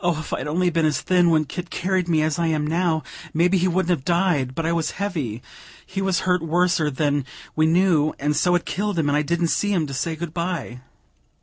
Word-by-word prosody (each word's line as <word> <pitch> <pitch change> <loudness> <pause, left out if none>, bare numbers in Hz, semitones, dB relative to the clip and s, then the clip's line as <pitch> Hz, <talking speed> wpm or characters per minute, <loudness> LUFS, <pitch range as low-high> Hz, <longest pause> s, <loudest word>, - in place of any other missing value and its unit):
if 160 -3 -1
I'd - - -3
only 175 +4 +1
been 165 -1 +2
as 150 -3 0
thin 180 -2 +3
when 155 -2 +3
Kit 175 +4 -6
carried 185 -1 -1
me 160 -3 +2
as 155 +1 -1
I 170 - +1
am 155 -2 0
now, 165 0 0 0.3
maybe 180 +3 +3
he 180 - +2
wouldn't 180 0 +1
have 165 -7 0
died; 170 -7 +1
but 165 - -2
I 165 - +1
was 165 -2 0
heavy, 155 - -3 0.4
he 195 +1 -4
was 190 -3 +1
hurt 180 -2 +1
worser 165 -1 +1
than 145 0 0 0.3
we 155 0 +3
knew, 165 -3 +3
and 150 +1 0
so 175 +4 +3
it 175 - 0
killed 205 -1 -2
him; 150 -3 +1
and 145 - +2
I 150 - +3
didn't 170 +2 0
see 205 +4 0
him, 175 -6 +1
to 140 - -7
say 160 +5 -2
good 160 0 -6
bye." 170 -8 -3
165 Hz, 230 wpm, -23 LUFS, 155-180 Hz, 0.4 s, thin